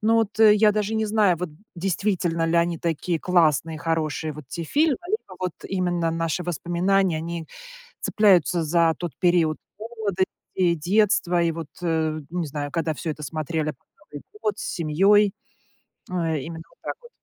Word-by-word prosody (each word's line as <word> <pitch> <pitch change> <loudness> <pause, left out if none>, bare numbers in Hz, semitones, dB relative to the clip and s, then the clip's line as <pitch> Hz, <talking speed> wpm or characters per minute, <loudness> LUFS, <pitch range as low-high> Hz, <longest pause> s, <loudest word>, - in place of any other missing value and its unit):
Но 225 +1 +3
вот, 220 -1 0
э, 215 -1 +8
я 210 0 +5
даже 210 +1 -1
не 220 0 +1
знаю, 210 -4 +3
вот 175 0 -4 0.2
действительно 175 -2 0
ли 165 - 0
они 170 -1 +2
такие 165 0 -1
классные, 160 -3 +2
хорошие 160 0 -1
вот 150 0 -10
те 170 +5 -5
фильмы, 290 - +2
либо 375 - -3
вот 180 -2 -1 0.2
именно 175 -3 0
наши 165 +1 -1
воспоминания, 175 +2 +1
они 165 0 -5 0.5
цепляются 180 -5 +3
за 165 +1 +3
тот 175 -3 -4
период 170 -3 +3 0.2
молодости 215 -4 -1 0.3
и 175 -2 +4
детства. 180 +1 +2
И 165 -1 +1
вот, 160 -2 -6
э, 160 -2 0
ну 175 +1 -2
не 165 - -2
знаю, 145 0 -4
когда 165 -1 -1
всё 160 +2 -4
это 150 - -11
смотрели 155 +1 -2
на - - -1 0.4
Новый 145 - -6 0.2
год 210 -1 -1
с - - -5 0.2
семьёй. 195 +6 +4 0.8
Э, 165 -4 0
именно 160 +3 -7
вот - - -27
так - - -3
вот. 475 - -15
170 Hz, 175 wpm, -24 LUFS, 160-195 Hz, 0.8 s, э